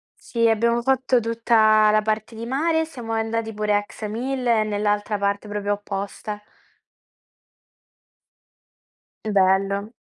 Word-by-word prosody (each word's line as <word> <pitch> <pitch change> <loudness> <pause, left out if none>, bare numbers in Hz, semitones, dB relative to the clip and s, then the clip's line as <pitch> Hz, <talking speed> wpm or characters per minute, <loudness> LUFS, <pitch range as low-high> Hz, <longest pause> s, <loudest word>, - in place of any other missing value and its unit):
Sì, 230 -1 0
abbiamo 235 +2 +2
fatto 260 -1 +2
tutta 220 -2 +3
la 215 0 +3
parte 215 +1 -2
di 230 +1 -6
mare 320 +6 +1
e - - -1
siamo 240 -7 -7
andati 225 0 -2
pure 210 0 0
a 205 - +1
Ksamil 245 +5 -4
e 225 -2 +3
nell'altra 210 0 -1
parte 200 +1 -1
proprio 205 0 -2
opposta. 205 +1 -5 2.8
Bello. 200 +1 +1
215 Hz, 120 wpm, -23 LUFS, 205-235 Hz, 2.8 s, tutta